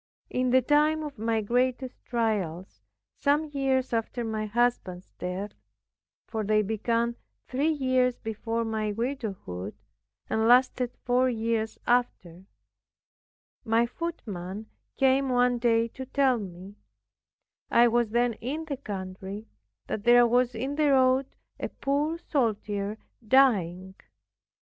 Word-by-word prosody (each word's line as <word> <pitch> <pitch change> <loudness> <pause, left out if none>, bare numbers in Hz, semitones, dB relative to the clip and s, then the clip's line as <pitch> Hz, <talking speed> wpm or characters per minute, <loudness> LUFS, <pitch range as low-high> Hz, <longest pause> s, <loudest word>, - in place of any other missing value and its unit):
In 255 0 0
the 260 +1 +4
time 300 +3 +3
of 290 -7 -7
my 225 0 0
greatest 250 +3 -1
trials, 200 -7 -2 0.4
some 295 +2 +2
years 265 -3 0
after 230 +2 -1
my 220 -1 -3
husband's 210 -5 -1
death 185 +3 -4 0.8
(for 220 -1 -3
they 215 +1 +2
began 230 +3 -1 0.3
three 280 +5 0
years 255 -4 +1
before 225 +1 -3
my 220 -1 -1
widowhood, 200 - -4 0.5
and 220 0 +1
lasted 250 0 +4
four 255 +1 +3
years 225 -1 -1
after) 190 -8 0 1.2
my 225 +1 +3
footman 220 - -6 0.3
came 270 0 +3
one 245 -1 +2
day 230 -1 +2
to 260 +2 -8
tell 265 -3 +2
me, 190 0 -9 1.0
(I 235 +1 +6
was 235 -1 +2
then 240 +1 +2
in 300 +7 -3
the 285 -3 -4
country) 195 -2 -6 0.4
that 205 - -4
there 240 +1 +7
was 245 +1 +2
in 265 +6 -3
the 295 -2 +3
road 260 0 +4 0.3
a - - -3
poor 295 +4 -1
soldier 215 -9 -1 0.3
dying. 190 -8 +3
235 Hz, 120 wpm, -27 LUFS, 215-260 Hz, 1.2 s, there